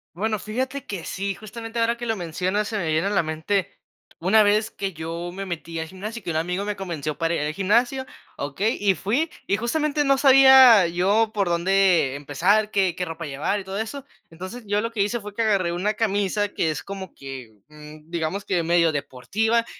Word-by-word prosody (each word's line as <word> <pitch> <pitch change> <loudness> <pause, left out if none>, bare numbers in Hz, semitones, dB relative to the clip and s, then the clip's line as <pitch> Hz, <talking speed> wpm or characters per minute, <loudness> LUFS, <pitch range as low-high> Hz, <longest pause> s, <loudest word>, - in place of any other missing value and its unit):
Bueno, 215 +2 -1
fíjate 255 +6 -4
que 190 -5 -5
sí, 195 0 -3
justamente 225 +2 -8
ahora 230 +1 +1
que 240 - -6
lo 225 -1 0
mencionas 185 +4 -2
se 215 - -2
me 175 - -2
viene 160 +5 +1
a - - +1
la 200 -3 +2
mente 160 +5 -2 0.4
una 210 +5 +4
vez 215 +2 +2
que 195 -3 -4
yo 165 +2 -5
me 195 +1 -5
metí 170 -2 -6
al 160 0 -4
gimnasio, 215 +6 -7
que - - -5
un 155 - -1
amigo 180 +4 -1
me 205 0 -3
convenció 160 -6 -4
para 165 0 0
ir - - -1
al 150 +1 -1
gimnasio, 240 - +1 0.3
¿okey? 145 +11 -1
Y 200 -2 +2
fui, 235 - 0 0.2
y 200 - +1
justamente, 295 +5 0
no 275 -1 +4
sabía 265 -7 +8
yo 200 +6 +2
por 200 -4 0
dónde 175 -5 +3
empezar, 185 +10 +1
qué 190 -4 +1
qué 180 - -3
ropa 165 -1 -5
llevar 145 +8 -2
y 190 - -9
todo 190 +1 -5
eso. 240 +6 -5 0.2
Entonces, 185 +9 -8
yo 205 +1 0
lo 230 +1 -2
que 210 - -1
hice 235 +4 -2
fue 205 0 -9
que - - -1
agarré 195 -6 +1
una 205 +5 -1
camisa 205 -1 0
que 165 - -1
es 155 - -4
como 195 -2 -8
que, 135 -4 -9 0.2
mm, 150 +1 -14
digamos 170 +4 -3
que 175 -3 0
medio 170 -1 +3
deportiva 220 - -1
195 Hz, 210 wpm, -23 LUFS, 170-220 Hz, 0.4 s, sabía